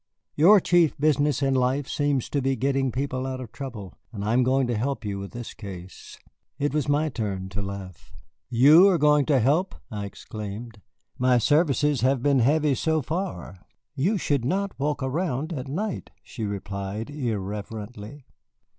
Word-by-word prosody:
Your 195 +8 +7
chief 175 -3 +3
business 145 -1 +2
in 135 0 +2
life 130 +2 +1
seems 145 -3 0
to 140 - 0
be 135 +1 +1
getting 135 +1 0
people 130 0 -2
out 130 -1 -4
of 125 -4 -8
trouble, 115 - -7 0.2
and 105 -2 -5
I 110 - +1
am 125 - +4
going 130 +1 +2
to 120 -1 -1
help 120 0 -2
you 100 -1 -3
with 100 0 -6
this 120 -1 -8
case." 95 -4 -10 0.4
It 145 0 -1
was 150 -1 0
my 150 +2 +2
turn 100 -7 -4
to 100 +2 -4
laugh. 95 -4 -8 0.4
"You 145 +10 +7
are 185 - +3
going 150 -2 +4
to 140 -4 +4
help!" 150 - +1 0.2
I 105 -2 -4
exclaimed. 105 +2 -8 0.4
"My 125 0 +4
services 145 0 +2
have 130 0 +2
been 140 -2 +3
heavy, 145 +4 +3
so 160 +3 0
far." 160 - -4 0.4
"You 180 +10 +1
should 145 -7 0
not 195 +9 0
walk 145 0 -1
around 155 +2 -2
at 135 -3 -5
night," 195 +9 -3
she 115 -4 -6
replied 100 +3 -5
irrelevantly. 110 0 -5
130 Hz, 170 wpm, -25 LUFS, 110-145 Hz, 0.4 s, Your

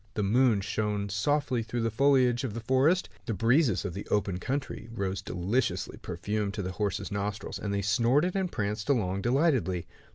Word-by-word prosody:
The 105 - 0
moon 115 0 +3
shone 105 0 -2
softly 125 +4 +1
through 115 +2 -3
the 115 - 0
foliage 130 0 +3
of 115 -5 -3
the - - -3
forest. 130 +10 +2 0.2
The 115 - -1
breezes 115 - +3
of 90 - -3
the 100 - -6
open 100 -3 0
country 135 0 -4
rose 100 -4 -2
deliciously 100 +8 -1
perfumed 105 +3 -3
to 100 - -3
the 95 - -3
horse's 100 0 -2
nostrils, 100 +1 -3
and 100 - -3
they 100 0 -1
snorted 125 - +2
and 190 -2 0
pranced 105 0 -3
along 100 -8 +1
delightedly. 120 - +1
110 Hz, 175 wpm, -29 LUFS, 100-130 Hz, 0.2 s, moon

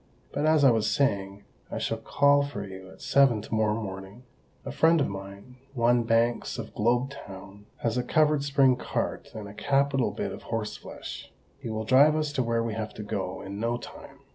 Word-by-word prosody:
But, 145 +2 0
as 155 -2 +4
I 135 - +7
was 110 -2 +1
saying, 100 -8 0 0.3
I - - -4
shall 115 - -2
call 140 +4 +3
for 140 -8 -4
you 95 -1 -10
at 95 - -14
seven 135 -5 +4
to - - -8
morrow 110 0 +1
morning; 95 +2 -8 0.4
a - - -4
friend 165 0 +4
of 140 - +2
mine—one 120 +5 -2
Banks 115 +1 +1
of 110 -2 -7
Globe 120 +5 +1
Town—has 105 0 -6
a - - -1
covered 150 +1 +2
spring 135 -3 +3
cart - - -3
and 105 -2 -6
a 100 - -10
capital 135 +1 +1
bit - - -4
of - - -8
horse 115 -2 -3
flesh. - - -9 0.3
He - - -6
will 110 0 -3
drive 140 +6 +6
us 155 -2 -1
to 130 - +1
where 115 -1 0
we 115 -1 -3
have 110 0 -5
to 105 - -6
go, 95 -3 -4
in 100 +1 -6
no 115 +2 0
time. - - -12
115 Hz, 195 wpm, -27 LUFS, 105-140 Hz, 0.4 s, I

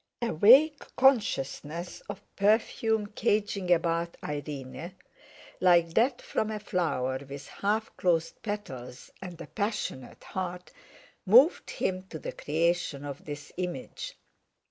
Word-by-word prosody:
A 235 - 0
vague 270 - +7 0.2
consciousness 175 - +1
of 200 0 -6
perfume 220 +1 +2
caging 205 -3 0
about 170 0 +1
Irene, 145 +3 -6 0.6
like 170 -2 +4
that 245 +5 +2
from 215 - -1
a 215 - -3
flower 155 -10 -1
with 140 0 -8
half 215 +2 -2
closed 165 -3 0
petals 135 - -6
and 180 -3 -8
a - - -6
passionate 205 - -4
heart, 180 -1 -5 0.5
moved 250 - +5
him 185 0 -2
to 160 - -6
the - - -5
creation 160 -2 -1
of 140 -1 -7
this 145 -1 -7
image. 185 - -5
180 Hz, 120 wpm, -29 LUFS, 155-210 Hz, 0.6 s, vague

